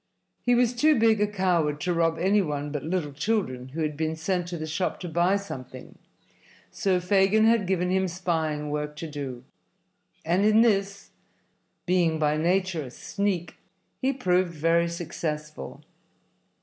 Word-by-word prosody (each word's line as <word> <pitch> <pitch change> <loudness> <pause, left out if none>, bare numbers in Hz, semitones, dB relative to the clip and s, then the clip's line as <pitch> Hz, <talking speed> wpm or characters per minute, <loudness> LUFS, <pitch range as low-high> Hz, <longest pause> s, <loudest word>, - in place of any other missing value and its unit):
He 245 0 +3
was 245 0 +3
too 300 +4 +3
big 220 -2 +4
a 210 - +3
coward 175 -7 0
to 180 +2 0
rob 165 -1 +1
any 200 +3 +3
one 145 -4 -3
but 150 -1 -3
little 165 -3 -2
children 145 - -1
who 160 +4 -3
had 150 -1 -2
been 160 +1 -2
sent 175 +2 -2
to 175 -1 -5
the 155 - -4
shop 160 +4 -2
to 180 - -4
buy 175 +4 +2
something, 130 -10 -7 0.8
so 185 -2 +1
Fagin 195 +4 +3
had 225 -4 +3
given 180 -1 0
him 190 0 +2
spying 160 -4 -2
work 150 0 -3
to 160 +2 -6
do, 140 -5 -6 0.8
and 175 +4 +2
in 215 +1 +5
this, 200 -3 +1 0.7
being 175 -3 +2
by 150 -1 +1
nature 180 +1 +1
a 135 - -7
sneak, 185 - -3 0.4
he 265 - +2
proved 185 -8 0
very 165 +2 +2
successful. 155 -3 -5
175 Hz, 160 wpm, -26 LUFS, 155-195 Hz, 0.8 s, in